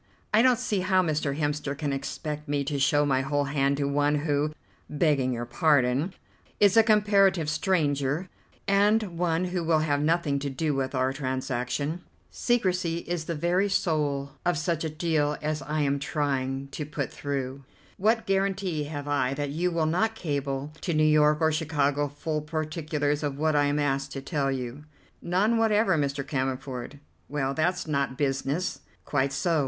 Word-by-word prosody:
I 215 - +6
don't 250 -1 +5
see 205 -2 -1
how 185 0 +3
Mr. 150 -4 -1
Hemster 145 -2 -2
can 145 -2 -2
expect 150 +2 -5
me 145 -1 0
to 140 0 -2
show 145 +1 +3
my 130 -2 +2
whole 145 +1 0
hand 140 0 +1
to 145 - 0
one 145 +1 +2
who, 150 0 0 0.4
begging 145 -4 +1
your 120 -1 -3
pardon, 135 +5 +2 0.4
is 205 0 +5
a 225 - +9
comparative 205 -6 +3
stranger, 150 -1 0 0.4
and 205 +3 +4
one 170 0 0
who 180 -2 -1
will 160 -1 +2
have 145 -2 +1
nothing 155 -2 +1
to 140 0 -3
do 150 +3 -1
with 135 0 -2
our 130 +1 +1
transaction. 130 +3 -2 0.3
Secrecy 185 -8 0
is 175 -2 -2
the 170 - -3
very 175 +6 +1
soul 145 -7 0
of 175 -2 +1
such 165 +2 -1
a 160 - -1
deal 155 -2 0
as 155 0 -2
I 150 +3 -2
am 140 -1 +1
trying 135 -2 -2
to 150 - -5
put 145 -2 -4
through. 135 -1 -4 0.3
What 220 +3 +2
guarantee 195 -5 0
have 145 -1 -6
I 135 -2 +1
that 145 0 -3
you 170 +5 0
will 165 -2 0
not 215 +8 +1
cable 145 -4 -3
to 170 - -1
New 155 - +3
York 150 0 +4
or 160 0 +4
Chicago 145 -2 0
full 150 +2 -3
particulars 150 -1 -2
of 145 -2 -2
what 155 +1 +1
I 145 0 +4
am 145 +1 +1
asked 135 -2 0
to 135 - -5
tell 140 -2 0
you." 130 +2 -5 0.4
"None 205 +6 +2
whatever, 215 -4 +3
Mr. 140 -2 -1
Cammerford." 130 -1 -3 0.3
"Well, 135 -1 -1
that's 175 +4 0
not 140 -4 -1
business." 140 +5 -1 0.3
"Quite 140 -1 0
so. 160 +4 +1
150 Hz, 170 wpm, -27 LUFS, 140-170 Hz, 0.4 s, a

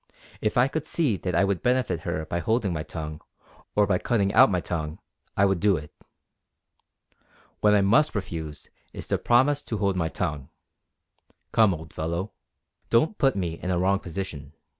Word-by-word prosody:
If 110 - 0
I 125 +2 +5
could 155 +2 -4
see 145 -11 +1
that 90 +1 -3
I 85 - +4
would 100 -2 0
benefit 125 -8 +1
her 80 -1 -3
by 85 - -2
holding 110 -2 0
my 80 - -2
tongue, 75 -1 -6 0.5
or 105 - +4
by 95 -2 +1
cutting 100 -4 +1
out 130 +3 +7
my 90 -3 +1
tongue, 80 -3 -4 0.4
I 100 - +5
would 95 -2 +1
do 100 -2 +3
it. 75 0 -9 1.7
What 105 0 +4
I 100 - +4
must 115 +10 +3
refuse 80 -7 -5 0.2
is - - -8
to - - +1
promise 135 +4 +3
to 110 - -4
hold 100 -2 +1
my 85 -3 0
tongue. 75 -6 -3 1.0
Come, 110 -3 +5
old 80 0 -11
fellow, 85 +6 -3 0.6
don't 155 - +2
put 135 -3 +3
me 85 -4 -3
in 90 - -3
a 90 - +1
wrong 95 +2 +2
position. 90 -5 -6
95 Hz, 180 wpm, -26 LUFS, 85-110 Hz, 1.7 s, out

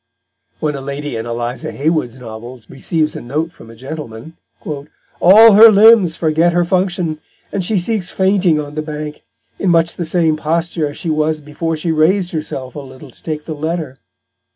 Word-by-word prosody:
When 150 -1 -1
a 140 - -6
lady 140 0 -5
in 115 +1 -4
Eliza 120 +1 -4
Haywood's 145 -5 -1
novels 120 0 -10
receives 155 +3 -1
a - - -6
note 155 +7 -3
from 115 - -15
a 115 - -13
gentleman, 135 +2 -8 0.3
"all 180 +8 +4
her 220 +3 +9
Limbs 210 -5 +6
forget 165 +1 +1
their 175 0 +2
Function, 175 -3 -1 0.3
and 200 - -2
she 205 +4 0
sinks 185 0 -1
fainting 190 -4 +2
on 145 -1 -6
the 155 - -3
Bank, 150 -1 -6 0.4
in 195 - 0
much 165 -1 +3
the 175 - -3
same 160 -1 +1
posture 165 0 -1
as 145 - -8
she 165 - -3
was 155 0 0
before 150 +2 -4
she 160 +2 -2
rais'd 175 +4 +2
herself 135 -5 -5
a - - -7
little 130 0 -12
to - - -19
take 155 -2 -5
the 160 - -5
Letter." 155 -3 -4
155 Hz, 180 wpm, -16 LUFS, 145-175 Hz, 0.4 s, her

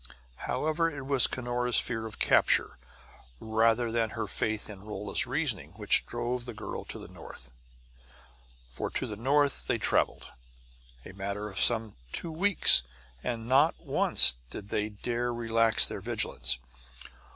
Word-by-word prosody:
However, 155 +2 0
it 140 -4 -8
was 135 -3 +4
Cunora's 125 -1 -1
fear 110 -2 -3
of 110 - -11
capture, - - +2 0.6
rather 115 +1 +1
than 115 -1 0
her - - -2
faith 110 -1 -2
in 100 -3 -10
Rolla's 105 +1 -1
reasoning, 120 - -2
which 105 0 +2
drove 120 +1 -4
the 120 -3 -8
girl 105 - -7
to - - -7
the - - -11
north. - - -11 1.2
For 60 - -5
to - - -3
the 105 - -6
north 140 +5 0
they - - 0
traveled, - - 0 0.8
a - - -10
matter 100 +2 -5
of 95 - -4
some 110 -3 0
two 165 - 0
weeks; 170 - +6 0.4
and 115 -1 -4
not 140 +5 +3
once 60 - +5
did 100 - -9
they 105 +1 -2
dare 120 +3 -3
relax 115 -1 +2
their - - -6
vigilance. 65 0 0
115 Hz, 145 wpm, -28 LUFS, 105-125 Hz, 1.2 s, weeks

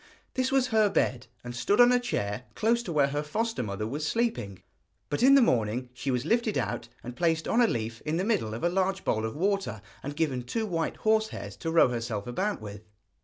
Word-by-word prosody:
This 260 0 0
was 265 -2 +2
her 220 -2 +4
bed, 125 -9 0 0.2
and 120 0 -7
stood 200 - +1
on 245 0 +8
a 250 - +4
chair 115 - -3
close 230 +2 +2
to 225 - -6
where 145 -3 +3
her 145 +1 -1
foster 225 +10 -2
mother 105 -2 -3
was 140 +7 -4
sleeping; 190 - -1 0.5
but 145 - -1
in 270 +2 +7
the 275 - +7
morning 120 - 0
she 130 +2 -4
was 125 0 0
lifted 230 +2 +1
out, 115 0 -2 0.2
and 120 0 -7
placed 165 0 +1
on 240 - +3
a 235 - +5
leaf 115 - -3
in 155 +2 -1
the 180 - 0
middle 190 - 0
of 115 - -7
a - - +4
large 190 +1 0
bowl 110 0 +1
of 110 - -4
water, 195 - -1 0.2
and 145 +1 -6
given 145 -6 0
two 220 - -2
white 165 -5 -2
horse 220 0 +2
hairs - - -7
to 165 - -4
row 165 -5 +5
herself 115 -4 -3
about 190 +12 -2
with. 105 -1 -8
155 Hz, 225 wpm, -28 LUFS, -, 0.5 s, on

